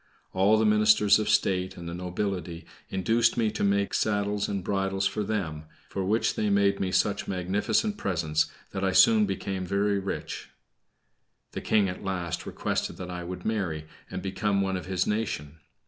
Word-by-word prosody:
All 100 +3 +4
the 110 - +2
ministers 105 -1 +5
of 110 - -1
state 95 -1 +1
and 85 - -7
the 85 - -5
nobility 90 -1 -4 0.2
induced 115 +5 +2
me 110 -2 +2
to - - -3
make 100 0 +1
saddles 105 -1 0
and 100 -2 -3
bridles 95 0 -1
for 100 +2 0
them, 85 -8 -3 0.2
for 95 - -3
which 105 +5 +1
they 105 - 0
made 100 0 +3
me 95 -1 -1
such - - +1
magnificent 100 - 0
presents 80 - 0 0.2
that 95 - -3
I 95 -1 +1
soon 220 - +6
became 95 - -3
very 100 +2 +1
rich. 95 0 -5 1.0
The - - -5
King 105 -3 +3
at 90 +1 -6
last 90 -4 -3
requested - - -2
that 90 -1 -6
I 90 0 -5
would 90 +1 -7
marry, 90 -8 -1 0.2
and 90 - -5
become 100 +1 0
one 95 -1 0
of 90 - -5
his 95 -2 0
nation. 80 -8 -3
95 Hz, 175 wpm, -27 LUFS, 90-105 Hz, 1.0 s, soon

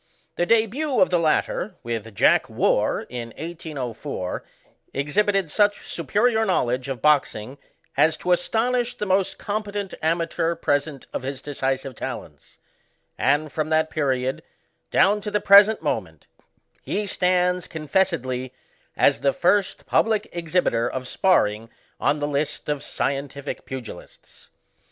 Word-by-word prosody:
The 175 - 0
debiU 230 +7 +2
of 275 - +4
the 175 - +3
latter, 165 +5 0
with 115 -2 -5
Jack - - +4
fVarr, - - +1
in 120 -1 -5
1804, 145 - -5 0.5
exhibited 190 +5 +1
such 205 +2 +2
superior 215 - +1
knowledge 130 - 0
of 130 -4 -5
boxing 140 -4 +1 0.4
as 160 - +3
to 180 - -2
astonish 240 +7 +1
the 210 - -2
most 190 -1 +1
competent 205 -2 -4
amateur 165 +1 0
present 145 -3 -1
of - - -2
his 135 +1 -5
decisive 135 -1 -2
talents; - - -8 0.6
and, 145 +2 +1
from 155 +2 -2
that 160 0 +2
pe 155 - -2
riod, 130 -1 0 0.5
down 205 +2 +3
to 210 - -4
the 210 - +1
present 205 +2 +6
moment, - - -3 0.6
he 210 - -2
stands 180 -2 +1
con 155 -1 -7
fessedly, 135 -8 0 0.5
as - - +4
the 140 - +2
first 195 +5 +1
public 220 -2 +2
exhibitor 165 -9 0
of 130 -1 -5
sparring 115 - +2 0.3
on 150 - +2
the 145 0 -2
list 145 +1 -2
of 145 -2 -1
scientific 140 0 -4
pugilists. 130 -4 -10
160 Hz, 130 wpm, -23 LUFS, 135-195 Hz, 0.6 s, present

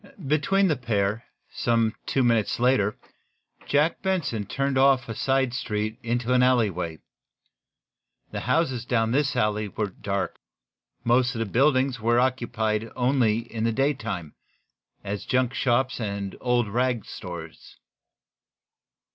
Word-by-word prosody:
Between 155 +8 +2
the 155 - +2
pair, 110 -3 -1 0.3
some 115 -2 +1
two 135 - +1
minutes 115 -3 +2
later, 120 -5 +2 0.7
Jack 150 +3 +2
Benson 165 - -1
turned 140 0 -1
off 130 -1 +4
a 115 - -4
side 130 +1 +1
street 110 -2 -3
into 120 +1 -1
an 125 - +4
alleyway. 100 -10 +1 1.3
The - - -3
houses 130 -3 0
down 115 -2 +1
in - - -2
this 145 +3 +1
alley 105 0 +1
were 100 0 -3
dark. 100 +1 -3 0.6
Most 125 +1 +2
of - - -3
the - - -3
little 100 - -11
buildings 130 -1 +3
here 110 - -11
were 120 +1 +4
occupied 115 -4 0
only 125 -3 +2
in 110 -1 -2
the 115 - +2
daytime, 110 - -2 0.7
as 100 0 -4
junk 125 -1 +1
shops 130 0 +1
and 100 -2 -4
old 125 -2 +1
rag 120 0 0
stores. 85 -3 -9
120 Hz, 140 wpm, -25 LUFS, 110-130 Hz, 1.3 s, off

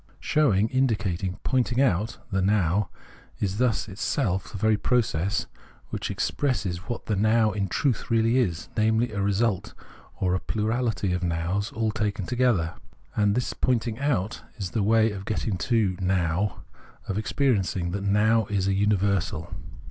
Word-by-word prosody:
Showing, 110 -9 +2
indicating, 100 -8 0
pointing 125 -1 +1
out 110 -4 +1
[the 95 -1 +1
Now] 95 -1 +2 0.5
is 100 +1 -1
thus 125 -5 +1
itself 95 -1 -1
the 105 - -5
very 110 +2 +3
process 105 -4 0 0.5
which - - -3
expresses 105 -11 -1
what 120 - -4
the 110 - 0
Now 110 +2 +3
in 100 -1 -1
truth 125 +5 -1
really 115 +2 +3
is: 85 -9 -1
namely 110 +2 +2
a 100 -1 -2
result, 100 0 0 0.4
or 90 -1 +1
a 90 - +1
plurality 110 -3 -1
of 90 - -1
Nows 90 +4 -1
all 110 -1 -1
taken 105 -2 -2
together. 120 -8 +1 0.4
And 105 -1 +2
the 125 - -1
point 125 -3 +1
ing 115 -1 -4
out 120 -7 -1 0.2
is 95 -5 -4
the 110 - 0
way 110 +2 +4
of 95 -2 -6
getting 105 0 -2
to 110 -6 +2
know, 90 0 0 0.5
of 100 +1 -1
experiencing, 100 -8 0
that 100 +2 -3
Now 105 +2 +3
is 100 -2 0
a 100 - +2
universal. 100 -5 0
105 Hz, 155 wpm, -26 LUFS, 95-115 Hz, 0.5 s, way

